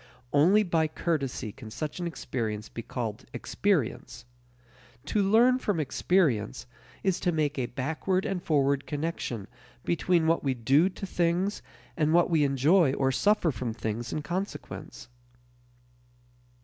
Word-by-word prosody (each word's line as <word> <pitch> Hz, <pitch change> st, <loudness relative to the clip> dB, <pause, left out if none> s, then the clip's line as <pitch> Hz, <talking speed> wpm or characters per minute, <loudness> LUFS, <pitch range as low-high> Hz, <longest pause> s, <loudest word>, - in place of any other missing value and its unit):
Only 180 Hz, +9 st, +5 dB
by 165 Hz, -4 st, +1 dB
courtesy 140 Hz, -8 st, -2 dB
can 115 Hz, 0 st, -11 dB
such 150 Hz, +9 st, -5 dB
an 175 Hz, -, -2 dB
experience 115 Hz, -8 st, -4 dB
be 115 Hz, -, -6 dB
called 115 Hz, -1 st, -5 dB
experience. 160 Hz, -, -1 dB, 0.8 s
To 210 Hz, -, +1 dB
"learn 235 Hz, +6 st, +4 dB
from 205 Hz, -8 st, -1 dB
experience" 135 Hz, -, +1 dB, 0.4 s
is 190 Hz, -2 st, +1 dB
to 180 Hz, -, +1 dB
make 150 Hz, -3 st, 0 dB
a 125 Hz, -, -1 dB
backward 160 Hz, +9 st, -1 dB
and 190 Hz, -2 st, -2 dB
forward 140 Hz, -4 st, +1 dB
connection 145 Hz, -9 st, -3 dB, 0.4 s
between 170 Hz, -1 st, +2 dB
what 165 Hz, +1 st, +2 dB
we 135 Hz, -2 st, 0 dB
do 135 Hz, +9 st, +3 dB
to 195 Hz, -, -7 dB
things 180 Hz, +2 st, 0 dB, 0.3 s
and 155 Hz, 0 st, +2 dB
what 175 Hz, 0 st, +4 dB
we 160 Hz, -3 st, +4 dB
enjoy 140 Hz, +3 st, +4 dB
or 135 Hz, -1 st, +1 dB
suffer 200 Hz, +3 st, +2 dB
from 115 Hz, -1 st, -4 dB
things 115 Hz, +1 st, -4 dB
in 150 Hz, -, -3 dB
consequence. 185 Hz, +6 st, -5 dB
155 Hz, 135 wpm, -28 LUFS, 130-180 Hz, 0.8 s, Only